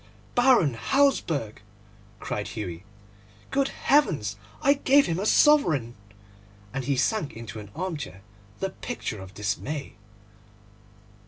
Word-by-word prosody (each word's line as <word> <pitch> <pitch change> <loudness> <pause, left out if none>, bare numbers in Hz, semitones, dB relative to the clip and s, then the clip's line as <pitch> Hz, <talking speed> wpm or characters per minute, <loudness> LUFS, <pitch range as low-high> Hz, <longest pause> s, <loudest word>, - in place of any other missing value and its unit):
'Baron 245 - +4
Hausberg!' 155 - +1 0.6
cried 105 - -3
Hughie. 95 -5 -6 0.7
'Good 275 0 +2
heavens! 150 - +1 0.3
I 280 - +6
gave 280 0 +4
him 165 +1 -1
a 205 - -1
sovereign!' 165 - +4 0.8
and 135 -1 -3
he 140 +1 +1
sank 155 - 0
into 115 -1 -8
an 105 -1 -10
armchair 160 - -5 0.4
the 195 0 -1
picture 190 - -5
of 95 +1 -11
dismay. 120 +8 -3
150 Hz, 110 wpm, -26 LUFS, -, 0.8 s, I